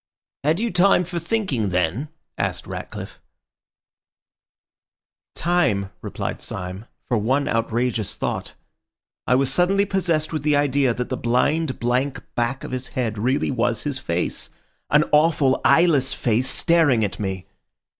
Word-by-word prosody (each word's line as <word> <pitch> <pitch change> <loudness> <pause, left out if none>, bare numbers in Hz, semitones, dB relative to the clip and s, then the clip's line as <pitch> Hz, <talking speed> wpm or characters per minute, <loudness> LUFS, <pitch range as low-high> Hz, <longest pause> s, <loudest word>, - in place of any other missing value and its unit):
"Had 155 +5 +2
you 235 +1 -1
time 180 0 +4
for 175 0 -4
thinking 170 - -1
then?" 90 - -1 0.3
asked - - -2
Ratcliffe. - - -7 2.2
"Time," 110 - +1
replied - - -4
Syme, 90 +4 -5 0.2
"for 120 - 0
one 130 +7 +1
outrageous 115 -1 -1
thought. - - -3 0.7
I 125 - +4
was 135 0 +2
suddenly 195 +4 +3
possessed 170 -6 0
with 155 - -1
the 150 0 +2
idea 140 -3 +2
that 125 - -3
the 130 - -2
blind, 135 +5 +1
blank 125 +2 0
back 120 +3 -1
of - - -6
his 130 0 -3
head 115 -5 -3
really 130 +6 +1
was 120 -3 0
his 145 -3 -2
face—an 90 - -1
awful, 150 -3 +3
eyeless 145 -3 +4
face 120 +3 +1
staring 150 -10 +3
at 100 - -5
me! 95 -3 -3
130 Hz, 135 wpm, -22 LUFS, 115-155 Hz, 2.2 s, time